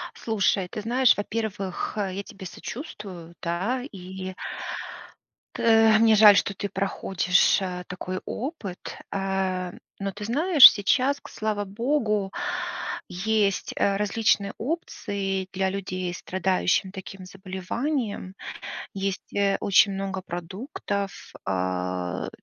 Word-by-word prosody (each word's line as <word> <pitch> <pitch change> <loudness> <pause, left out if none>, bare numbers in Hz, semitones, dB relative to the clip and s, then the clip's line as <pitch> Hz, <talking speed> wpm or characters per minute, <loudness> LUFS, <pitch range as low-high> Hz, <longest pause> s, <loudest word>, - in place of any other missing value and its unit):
Слушай, 200 -4 +1
ты 215 - -5
знаешь, 245 +2 +4
во-первых, 205 -3 -3
а, 200 -2 0
я 200 +2 -4
тебе 195 -1 -11
сочувствую, 185 - -8
да, 190 +9 -1
и 185 0 -7 1.2
тэ 225 -1 +5
мне 225 -1 +6
жаль, 210 -1 +9
что 200 -1 +1
ты 200 - -3
проходишь, 190 -1 +2
э, 180 -1 -3
такой 185 +1 -4
опыт, 235 - -5
а. 190 -2 -1 0.3
Но 195 0 -2
ты 205 +2 -7
знаешь, 295 - +9
сейчас, 260 +7 +1
к - - -11
слава 215 -1 -2
богу, 210 -2 0 0.8
есть, 200 +2 0
э, 200 0 +2
различные 205 -1 +1
опции 200 - -3
для 190 0 +1
людей, 185 -2 -3
страдающих 185 +1 0
таким 190 0 -9
заболеванием. 195 +3 -3 0.6
Есть, 195 -1 -3
э, 200 -1 +2
очень 200 0 +5
много 195 -1 -3
продуктов, 195 - -5
а, 90 -1 -2
195 Hz, 110 wpm, -26 LUFS, 185-215 Hz, 1.2 s, жаль